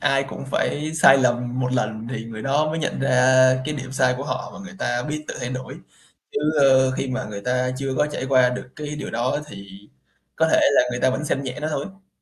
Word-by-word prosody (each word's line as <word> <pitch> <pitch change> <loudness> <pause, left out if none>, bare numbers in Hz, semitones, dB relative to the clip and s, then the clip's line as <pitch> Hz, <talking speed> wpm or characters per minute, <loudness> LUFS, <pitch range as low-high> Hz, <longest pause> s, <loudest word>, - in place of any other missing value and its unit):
ai 135 0 +2
cũng - - -7
phải 150 +2 -1
sai 140 -4 +7
lầm 125 0 0
một 125 0 -1
lần 110 -2 -2
thì 115 -3 -4
người 110 -1 -8
đó 145 +4 +1
mới 160 - -2
nhận 155 - -2
ra 135 -1 +2 0.5
cái 150 - -3
điểm 135 -2 -7
sai 130 -2 +2
của 135 - -5
họ - - -4
và - - -9
người 190 0 -10
ta 120 -6 -1
biết 150 +2 -4
tự - - -4
thay 125 0 -3
đổi, 130 0 -6 0.6
chứ, - - 0 0.2
ơ, 130 -1 +5
khi 130 +1 -3
mà 130 0 -3
người 105 -1 -7
ta 125 +3 0
chưa 135 -1 -2
có 150 - +2
trải 150 -3 -4
qua 130 -2 +4
được 125 0 -6
cái 150 0 -5
điều - - -5
đó 120 +4 -1
thì 100 -8 -10 0.7
có 160 0 +3
thể - - +5
là - - +5
người 125 0 -3
ta 130 - +3
vẫn 140 +4 -3
xem 140 -2 -1
nhẹ 130 0 -5
nó 155 - -2
thôi. 190 +6 -6
130 Hz, 245 wpm, -22 LUFS, 125-150 Hz, 0.7 s, sai